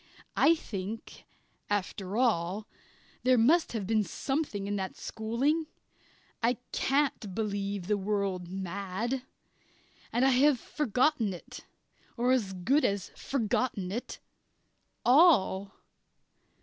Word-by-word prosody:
I 335 - +5
think, 215 - -7 0.4
after 200 0 -2
all, 205 -4 +1 0.5
there 255 0 +4
must 300 +9 +4
have 215 -4 -2
been 215 +1 +2
something 270 -4 -2
in 205 0 -2
that 190 -1 -4
schooling. 270 +9 -1 0.7
I 235 +1 +2
can't 270 -8 0
believe 200 -3 -2
the 205 +1 +1
world 195 -3 -1
mad. 195 +6 -3 0.9
And 240 +3 +2
I - - +6
have 265 +1 +4
forgotten 250 -6 +1
it 175 - -11 0.5
or 245 +2 +2
as 220 -7 +1
good 255 +12 +2
as 200 -2 0
forgotten 220 -6 -1
it 235 +5 -4 0.9
all! 240 - +5
215 Hz, 110 wpm, -30 LUFS, 195-255 Hz, 0.9 s, I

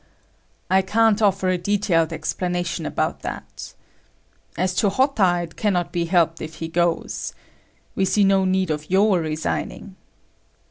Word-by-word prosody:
"I 190 +1 +4
can't 220 +2 +2
offer 195 -2 +2
a 180 -1 +1
detailed 175 -4 +1
explanation 175 +1 -3
about - - -2
that……as 185 +2 -8
to 205 - +3
Hotta, 195 -7 +2
it 165 - -10
cannot 185 -5 0
be 170 -1 -1
helped 165 -2 +1
if 160 0 -7
he 165 +1 -5
goes…… 170 0 -1 0.6
……we 195 - 0
see 205 +2 +2
no 195 -1 +4
need 185 -2 +1
of 150 0 -4
your 195 0 +3
resigning." 160 +4 -4
185 Hz, 135 wpm, -22 LUFS, 165-195 Hz, 0.6 s, I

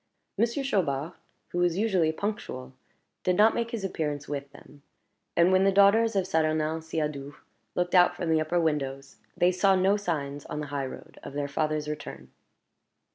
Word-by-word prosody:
Monsieur 235 +6 0
Chaubard, 165 - 0 0.4
who 175 - -3
was 175 -1 +2
usually 190 -7 +2
punctual, 160 -9 -5 0.5
did 180 - +2
not 215 +2 +6
make 235 0 -1
his 230 -4 -4
appearance 150 -6 -3
with 140 -1 -5
them; 145 0 -16 0.6
and 170 +2 +5
when 185 0 +4
the 195 - +4
daughters 200 +3 +5
of 190 -2 +2
Saturnin 155 -2 0
Siadoux 150 -3 -4 0.4
looked 180 0 -1
out 180 -1 +5
from 170 -3 -2
the 160 -1 +3
upper 175 +3 0
windows, 140 -4 -2 0.2
they 175 +1 +4
saw 190 +2 +3
no 190 +2 +3
signs 145 -7 -3
on 150 - -4
the 150 - -3
high 140 -2 -1
road - - -11
of - - -9
their 145 0 -2
father's 150 +1 -1
return. 150 0 -7
160 Hz, 175 wpm, -27 LUFS, 145-190 Hz, 0.6 s, not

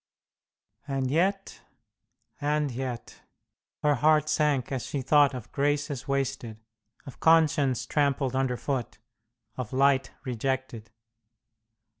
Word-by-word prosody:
And 135 -2 -1
yet, 195 +5 0 0.8
and 150 -1 0
yet... 125 -1 -6 0.6
her 150 -1 +4
heart 155 +2 +3
sank 150 -5 +1
as 130 -3 -2
she 140 -3 -4
thought 145 0 +4
of 125 -4 -8
graces 145 -1 -1
wasted, 135 -5 -2 0.5
of 135 - -11
conscience 145 -6 +3
trampled 140 -2 0
underfoot, 130 -2 -2 0.6
of 125 -4 -5
light 135 -1 +3 0.2
rejected. 125 -2 -3
135 Hz, 100 wpm, -27 LUFS, 130-150 Hz, 0.8 s, her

